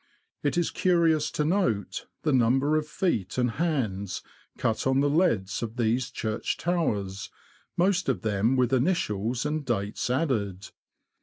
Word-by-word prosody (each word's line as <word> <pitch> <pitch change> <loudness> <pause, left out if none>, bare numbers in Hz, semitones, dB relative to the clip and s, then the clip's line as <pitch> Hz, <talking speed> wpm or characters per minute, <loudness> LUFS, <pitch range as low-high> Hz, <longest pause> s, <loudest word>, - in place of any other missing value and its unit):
It 145 - 0
is 175 - +1
curious 165 -4 +2
to 150 - -1
note 150 - 0 0.2
the 150 - +2
number 130 +4 +3
of 155 0 0
feet 140 - -1
and 125 -1 +2
hands 110 - -2 0.3
cut 110 +3 0
on 130 0 +3
the 145 +1 +3
leads 130 - +1
of 115 +1 -5
these 120 +2 +1
church 110 -3 -2
towers, 105 - -1 0.5
most 185 -2 +2
of 130 - -1
them 110 +3 +1
with 125 0 +2
initials 125 - 0
and 150 0 -1
dates 105 -4 -2
added. 110 - -1
130 Hz, 145 wpm, -27 LUFS, 110-155 Hz, 0.5 s, number